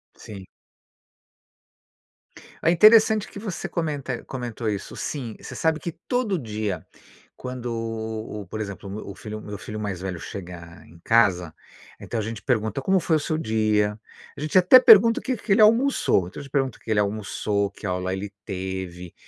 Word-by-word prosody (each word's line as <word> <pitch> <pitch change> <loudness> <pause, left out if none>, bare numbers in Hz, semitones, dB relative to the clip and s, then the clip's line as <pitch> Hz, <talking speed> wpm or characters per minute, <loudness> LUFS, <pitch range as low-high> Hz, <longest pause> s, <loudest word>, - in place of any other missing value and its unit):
Sim. 100 -3 -10 2.2
Ó, - - +1
interessante 215 +4 +6
que - - -10
você 200 -4 -5
comenta 145 -7 -3
comentou 120 -3 -4
isso. 100 -2 -5
Sim, 125 -7 -5
você - - -9
sabe 160 -1 +1
que 170 - -4 0.2
todo 245 -8 0
dia, 105 -6 -4 0.5
quando, 125 -1 -6
o 110 -1 -4
o 95 - -11
por 110 +3 -5
exemplo, 100 -1 -6
o - - -7
meu 105 - -7
o 100 - -8
filho 110 +1 -7
meu 105 -1 -7
filho 110 +2 -7
mais 100 -4 -4
velho 95 -3 -4
chega 85 -3 -9
em 85 - -17
casa, 95 -8 +3 0.5
então 115 - -5
a 110 - -2
gente 110 -1 -5
pergunta: 120 +1 -1
"Como 190 +5 +2
foi 160 -1 +2
o - - -2
seu 155 +1 -2
dia?" 110 -4 +1 0.4
A - - -7
gente 155 +4 +1
até 185 +8 +8
pergunta 230 -1 +7
o - - -14
que 260 -1 -1
que 205 - -5
ele 205 +2 +5
almoçou, 230 - +4
então 90 - -9
a - - -7
gente 140 - -13
pergunta 135 -4 0
o - - -31
que - - -12
ele 105 - +3
almoçou, 100 0 -1
que - - -11
aula 90 0 -2
ele 100 +1 -5
teve 95 -2 -5
110 Hz, 185 wpm, -24 LUFS, 100-155 Hz, 2.2 s, até